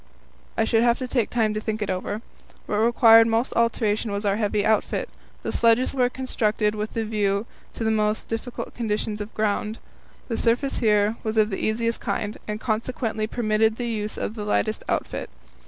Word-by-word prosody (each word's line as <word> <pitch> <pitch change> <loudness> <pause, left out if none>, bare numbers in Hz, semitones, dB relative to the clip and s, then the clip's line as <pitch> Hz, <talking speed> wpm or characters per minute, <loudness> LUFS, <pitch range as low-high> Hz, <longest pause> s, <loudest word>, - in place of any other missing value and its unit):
I 225 - +3
should 225 0 +3
have 235 0 +3
to 255 - -4
take 245 -4 0
time 220 -3 +1
to 215 - -2
think 215 0 -2
it 210 -2 -2
over. 200 +4 -3 0.4
What 210 - -1
required 225 0 +6
most 230 +2 +1
alteration 225 -2 +1
was 200 +1 -3
our 200 0 +2
heavy 210 -1 0
outfit. 220 -1 +1 0.4
The - - -2
sledges 230 +2 +3
were 250 -2 +2
constructed 220 -5 0
with 215 +1 -4
a 225 - +1
view 205 -1 0 0.3
to - - -3
the 220 - +2
most 215 0 0
difficult 230 +2 -5
conditions 210 -2 -2
of 205 +2 -6
ground. 215 +1 -1 0.5
The 230 - -2
surface 245 +4 +1
here 210 -1 +3
was 220 0 -3
of 215 0 +4
the 195 - -3
easiest 230 +1 0
kind, 210 0 -3
and 210 0 -3
consequently 220 -1 -2
permitted 220 -1 +1
the 240 0 -3
use 215 -2 -3
of - - -3
the 215 -2 -5
lightest 215 +1 0
outfit. - - -2
220 Hz, 190 wpm, -24 LUFS, 210-230 Hz, 0.5 s, required